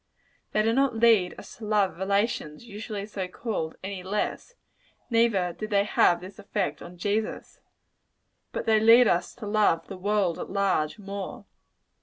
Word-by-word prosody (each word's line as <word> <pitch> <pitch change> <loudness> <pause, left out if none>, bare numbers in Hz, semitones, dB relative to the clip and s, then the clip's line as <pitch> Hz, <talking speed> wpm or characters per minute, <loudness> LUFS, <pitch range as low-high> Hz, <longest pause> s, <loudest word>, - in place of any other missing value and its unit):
They 215 - +2
do 225 +1 +2
not 270 -1 +2
lead 225 -5 +4
us - - -11
to 225 - -8
love 205 -4 +1
relations, 200 -4 -1
usually 210 -2 -6
so 200 -3 -4
called, 180 -5 -4
any 190 -1 -5
less: 210 - -3 0.6
neither 220 -7 +2
did 215 +4 -6
they 200 -2 +3
have 175 -4 +3
this 185 +2 -11
effect 195 -7 -2
on 175 +1 -10
Jesus. 205 +4 -2 0.9
But - - -4
they 220 -1 +4
lead 230 +2 +7
us 175 - 0
to 225 - -8
love 205 -6 +2
the 195 - -7
world 195 -2 0
at - - -6
large, 190 -6 0
more. 200 +2 -7
205 Hz, 160 wpm, -27 LUFS, 185-220 Hz, 0.9 s, lead